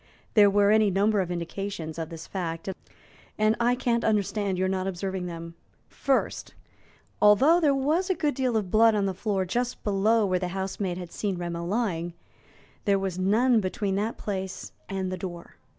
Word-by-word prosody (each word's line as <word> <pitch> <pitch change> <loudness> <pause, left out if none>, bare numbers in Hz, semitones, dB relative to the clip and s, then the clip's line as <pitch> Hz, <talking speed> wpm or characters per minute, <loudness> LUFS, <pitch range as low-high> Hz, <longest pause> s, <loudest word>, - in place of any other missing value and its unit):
There 205 -2 +7
were 200 +1 +4
any 215 -1 +4
number 200 +2 +2
of 180 - -3
indications 170 -1 -4
of 160 -1 -4
this 165 -1 -8
fact, 165 -3 -4 0.7
and 215 +1 +3
I 240 +1 +3
can't 240 -2 0
understand 205 -2 0
your 185 +1 +1
not 190 0 -1
observing 190 0 -3
them. 170 -1 -7 0.4
First, 275 -1 -1 0.7
although 265 +12 +6
there 295 -5 +3
was 310 +8 +1
a 375 - +2
good 295 -3 0
deal 255 -4 0
of 195 -4 -3
blood 225 0 +5
on 205 -1 +1
the 190 - -1
floor 195 0 -1
just 245 +6 -2
below 210 +2 +2
where 185 -2 +1
the 180 - -2
housemaid 190 -1 -3
had 180 -2 -7
seen 200 -3 -2
Rameau 170 -1 -4
lying, 175 -5 -1 0.7
there 200 -2 +3
was 190 -2 -3
none 225 +6 +3
between 195 0 -2
that 215 +3 -2
place 190 -2 -5 0.2
and 190 -1 -2
the 185 - -3
door. 175 -2 -8
195 Hz, 180 wpm, -27 LUFS, 185-220 Hz, 0.7 s, There